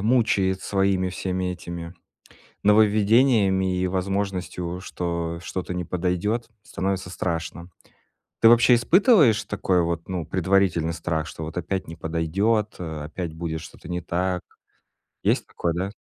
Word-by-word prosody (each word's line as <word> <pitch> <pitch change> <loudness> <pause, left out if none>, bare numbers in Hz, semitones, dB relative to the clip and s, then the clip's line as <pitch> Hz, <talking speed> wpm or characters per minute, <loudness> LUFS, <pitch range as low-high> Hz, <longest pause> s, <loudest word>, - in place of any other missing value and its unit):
мучает, 100 -4 +2
своими, 95 -2 +1
всеми 90 0 -2
этими, 85 -1 -7 0.7
нововведениями 105 -2 +4
и 90 - +1
возможностью, 90 -2 -2
что 85 -2 -3
что-то 90 +1 -4
не 90 -1 -3
подойдёт, 90 +7 -1
становится 95 -2 -3
страшно. 85 -1 -4 0.7
Ты 115 - +7
вообще 120 +1 +6
испытываешь 145 - +5
такой 95 -3 +1
вот, 85 0 -3
ну, 90 -3 -3
предварительный 95 -3 +1
страх, 80 -2 -2
что, 80 - -7
вот, 80 +2 -8
опять 95 +2 -2
не 80 - -8
подойдёт, 90 +7 0
э, 80 -3 -5
опять 85 +2 -5
будет 80 -1 -4
что-то 80 - -12
не 90 0 -2
так? 90 +1 -1 0.8
Есть - - +2
такое, 85 -1 -2
да? 95 +3 -2
90 Hz, 130 wpm, -24 LUFS, 85-100 Hz, 0.8 s, Ты